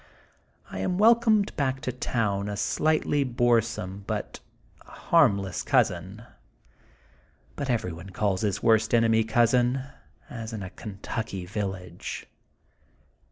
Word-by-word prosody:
I - - -5
am 180 - -1
welcomed 220 -1 +4
back 135 -2 0
to 130 - -2
town 105 -5 -1
a 100 - -4
slightly 150 +3 +1
boresome 120 -6 0
bnt - - -4 0.4
harmless 100 - +1
consin. 95 +6 0 1.3
Bnt 140 -2 -4
everyone 90 -6 -2
calls 95 0 -1
his 100 -2 -1
worst 110 0 +4
enemy 115 -1 +4
cousin, 120 +3 +2 0.4
as 115 -1 -7
in 105 -3 -5
a 95 - -7
Kentucky 100 -2 -5
village. 95 -3 -5
110 Hz, 110 wpm, -26 LUFS, 100-125 Hz, 1.3 s, welcomed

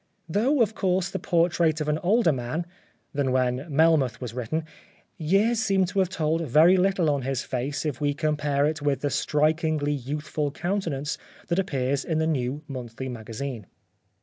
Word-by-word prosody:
Though, 235 - +3
of 220 0 -2
course, 185 -2 0
the 190 - -3
portrait 170 -3 +2
of 150 - -2
an 150 +1 +1
older 200 +1 +3
man 135 +6 -3 0.5
(than 140 -2 0
when 130 +2 0
Melmoth 145 -5 +3
was 125 -3 -6
written) 130 +7 -3 0.5
years 200 +8 +2
seemed 195 -5 +2
to 200 +1 -1
have 185 -2 +2
told 160 -2 0
very 160 +5 +5
little 190 -2 +2
on 140 -1 0
his 135 0 -2
face 135 +4 -3
if 150 -2 -3
we 145 -1 +1
compare 150 -2 +1
it 155 0 -1
with 140 -2 0
the 145 - -1
strikingly 155 0 +1
youthful 145 +2 -3
countenance 160 -4 -2 0.3
that 170 - +1
appears 140 -6 0
in 160 - -1
the 160 - +1
New 145 -1 -1
Monthly 130 -1 -6
Magazine. 115 -1 -6
150 Hz, 170 wpm, -26 LUFS, 135-170 Hz, 0.5 s, very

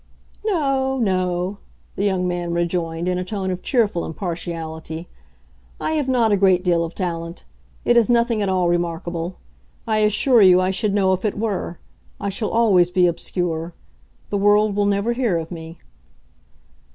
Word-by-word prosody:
"No—no," 240 - 0 0.3
the 195 - -3
young 190 -3 +1
man 175 -1 -2
rejoined, 170 -1 -1
in 180 0 0
a - - -2
tone 190 0 -3
of 180 0 -4
cheerful 215 -9 +1
impartiality, 165 -1 -5 0.7
"I - - -2
have 300 -4 0
not 240 -4 +2
a 205 - +4
great 185 -2 +3
deal 170 -2 +2
of 165 0 -6
talent. 170 -2 -4 0.4
It 240 - +4
is 235 0 +4
nothing 235 -2 +2
at 200 - 0
all 185 -2 +1
remarkable. 170 0 -2 0.5
I 220 -1 +1
assure 215 +3 +4
you 185 -2 +7
I 185 +1 +1
should 200 +1 0
know 190 -2 +3
if 185 - -2
it 210 -2 -1
were. 205 -5 -2 0.4
I 200 - -2
shall 210 +2 -2
always 200 -7 +4
be 180 0 +3
obscure. 170 -1 -2 0.6
The 200 - 0
world 205 +1 +3
will 205 0 +2
never 200 +4 +1
hear 235 -8 0
of 165 +1 -5
me." 165 0 -8
185 Hz, 165 wpm, -21 LUFS, 175-215 Hz, 0.7 s, you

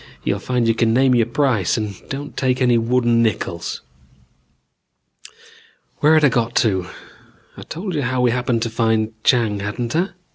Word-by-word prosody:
You'll - - -1
find 125 -2 -1
you 115 - +3
can 115 0 +1
name 130 0 +4
your 120 -2 +2
price 120 - +1
and 105 -4 -5
don't 145 +2 -6
take 130 -1 0
any 125 -2 +3
wooden 120 0 +2
nickels. 90 -6 -2 2.2
"Where 155 +2 +4
had 155 -1 +4
I - - +5
got 120 -1 -1
to? 95 -5 +1 0.7
I'd - - -12
told 185 +4 -5
you 150 - -1
how 130 0 -1
we 125 -1 +3
happened 120 -1 -1
to 115 - -3
find 110 -1 0
Chang, 115 -5 +2
hadn't 115 +5 -4
I? 180 +4 +1
120 Hz, 170 wpm, -20 LUFS, 110-130 Hz, 2.2 s, I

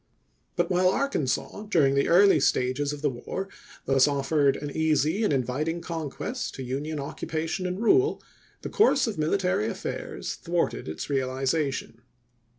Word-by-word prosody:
But - - 0
while 180 +1 +4
Arkansas, 195 - -1
during 145 -9 +3
the 140 0 +2
early 185 -1 +6
stages 130 +2 +1
of 145 0 -7
the 145 - +3
war, 130 +10 -5 0.4
thus 135 0 +4
offered 140 0 +2
an 145 0 -5
easy 160 +5 +1
and 210 - +2
inviting 140 +5 -1
conquest 170 - -5
to 135 - -6
Union 145 +5 -3
occupation 160 +5 -3
and 180 +1 -3
rule, 385 - +3 0.4
the - - -4
course 345 - +4
of 225 -6 -3
mili 155 +5 +1
tary 180 - 0
affairs 115 - -5
thwarted - - -2
its 80 0 -5
realization. 135 -2 -1
150 Hz, 150 wpm, -26 LUFS, 135-180 Hz, 0.4 s, early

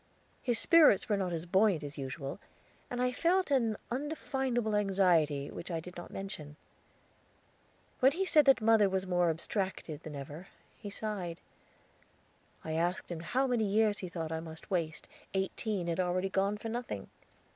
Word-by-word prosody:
His 240 -3 +1
spirits 305 - +6
were 210 - +2
not 190 -3 -1
as 165 0 -3
buoyant 190 -2 +3
as 145 0 -6
usual, 135 0 -5 0.5
and 245 - -4
I 250 0 +2
felt 345 +5 +1
an 230 -6 +2
undefinable 265 -5 -1
anxiety 175 -8 +2
which 170 - -7
I 165 -2 -1
did 180 +2 -10
not 175 - -8
mention. 160 -7 -7 1.4
When 265 0 +5
he 380 +4 0
said 305 -5 +5
that 270 -3 +5
mother 215 -2 +5
was 190 0 -1
more 180 -2 +2
abstracted 165 -2 -3
than 155 -2 -8
ever, 145 +6 -8 0.3
he 205 - -8
sighed. 200 -5 -4 1.3
I 160 - -3
asked 175 +3 -1
him 170 - -3
how 255 +11 0
many 245 -4 +1
years 210 +1 +2
he 185 - -5
thought 165 -2 -4
I 160 - -1
must 160 +3 -9
waste; 165 -4 -1 0.3
eighteen 190 0 -1
had 170 +1 -2
already 185 +1 +1
gone 195 +2 +1
for 225 +2 -6
nothing. 230 - -5
190 Hz, 165 wpm, -32 LUFS, 165-225 Hz, 1.4 s, spirits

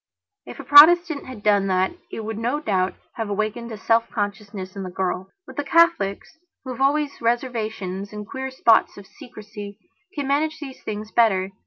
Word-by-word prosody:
If - - -10
a - - -6
Protestant 315 +1 +7
had 245 -5 -10
done 205 -2 +3
that 185 0 +1 0.2
it - - -5
would 220 0 -5
no 245 +6 -1
doubt 190 -9 -1 0.2
have 225 -2 -3
awakened 215 +3 -3
a 220 - -6
self 230 +1 +1
consciousness 205 -2 -5
in 200 - -5
the 185 - -5
girl. 185 0 -3 0.2
But 265 +2 -5
Catholics, 320 - +2 0.2
who 260 - -6
have 255 - -7
always 285 0 +1
reservations 220 -5 -2
and 210 0 -7
queer 265 +3 -5
spots 235 -4 +3
of 200 - -11
secrecy, 210 -7 -11 0.4
can 285 -3 -3
manage 310 +3 0
these 270 -4 -9
things 215 0 -6
better. 195 -5 +2
220 Hz, 175 wpm, -23 LUFS, 200-270 Hz, 0.4 s, Protestant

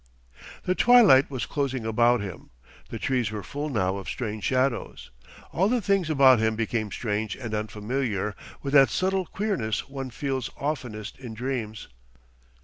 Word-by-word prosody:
The 180 - +1
twilight 220 - +6
was 130 -5 -3
closing 135 -5 -2
about 120 +2 +3
him. 95 -4 -8 0.4
The - - -5
trees 125 -5 0
were 105 -1 -5
full 145 +2 -4
now 95 -7 0
of 95 - -7
strange 110 -4 -4
shadows. 130 -1 -1 0.4
All 190 +4 +2
the 250 +1 +2
things 195 -5 +1
about 135 -5 +6
him 110 0 +1
became 110 -1 -2
strange 105 0 -2
and 115 -4 -6
unfamiliar 105 0 -2 0.3
with 140 0 -3
that 135 -4 +7
subtle 190 - 0
queerness 130 - -2
one 135 -1 -6
feels 130 0 -3
oftenest 125 -8 -4
in 120 -4 -8
dreams. 120 -3 -4
125 Hz, 150 wpm, -26 LUFS, 110-140 Hz, 0.4 s, that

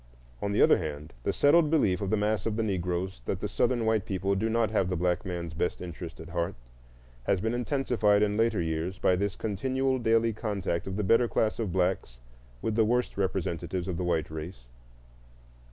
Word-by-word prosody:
On 100 - -1
the 100 - +4
other - - +5
hand, 75 -2 -6
the - - 0
settled 150 - +4
belief 105 - +2
of 100 - -2
the 110 - +2
mass 105 +1 0
of 110 - -1
the 115 - 0
Negroes 90 - -2
that - - -2
the - - -2
Southern 120 -2 +1
white 110 -2 +2
people 95 -1 -1
do 110 +3 0
not 115 -1 +1
have 95 -4 +1
the 90 - 0
black 90 +1 0
man's 85 -3 -4
best 85 +2 -1
interests 85 -1 -7
at 80 - -9
heart 85 -1 -2 0.7
has 95 - +2
been 110 +4 -1
intensified 120 -5 +2
in 105 0 +1
later 115 0 +2
years 80 +3 -2
by 90 - +3
this 100 +2 -1
continual 130 +5 -1
daily 115 0 +2
contact 100 -6 -2
of 95 - -3
the 105 - 0
better 115 +5 +4
class 110 -1 0
of 110 -5 -1
blacks 90 -9 -1 0.4
with 110 - 0
the 110 +1 +4
worst 120 +3 +1
representatives 90 -2 -2
of 90 -3 -2
the 90 - -2
white 80 -3 0
race. 80 -3 -7
100 Hz, 200 wpm, -28 LUFS, 90-110 Hz, 0.7 s, other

